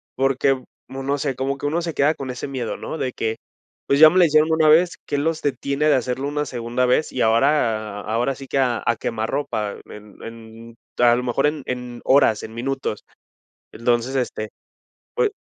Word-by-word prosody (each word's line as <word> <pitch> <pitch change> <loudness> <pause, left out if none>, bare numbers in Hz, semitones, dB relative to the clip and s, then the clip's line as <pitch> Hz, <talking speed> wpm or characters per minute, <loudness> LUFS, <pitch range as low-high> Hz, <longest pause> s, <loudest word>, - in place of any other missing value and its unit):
porque, 135 0 +1 0.3
uno 135 +2 -2
se, 140 -2 -2
como 135 +2 -2
que 145 - -6
uno 165 +4 0
se 165 -1 -4
queda 150 +3 +2
con 130 -2 -5
ese 125 +2 -6
miedo, 130 -4 -3
¿no?, - - -6
de 130 -4 -2
que, 110 0 -2 0.5
pues, 140 - +2
ya 155 - +11
me 180 - 0
la 180 - +7
hicieron 155 0 +3
una 160 -1 +3
vez, 170 +3 +4
¿qué 145 - -1
los 160 +2 -1
detiene 140 +1 -1
de 150 - +5
hacerlo 130 +2 -2
una 150 +1 -2
segunda 120 -1 -2
vez?, 125 +5 +1
y 130 - -2
ahora 110 -4 +1
ahora 120 +6 -1
sí 135 - -10
que - - -2
a 125 -3 +1
a 115 - +1
quemarropa 110 -2 -2
en 105 -1 -13
en 115 0 -11 0.2
a 120 -1 +5
lo 125 - -2
mejor 125 +3 +1
en 150 -1 -3
en 125 -1 -5
horas, 130 -6 +3
en 110 - -8
minutos, 130 -2 -3 0.7
entonces, 120 +3 0
este, 120 -4 -2 0.7
pue 450 -4 +1
130 Hz, 195 wpm, -22 LUFS, 115-145 Hz, 0.7 s, ya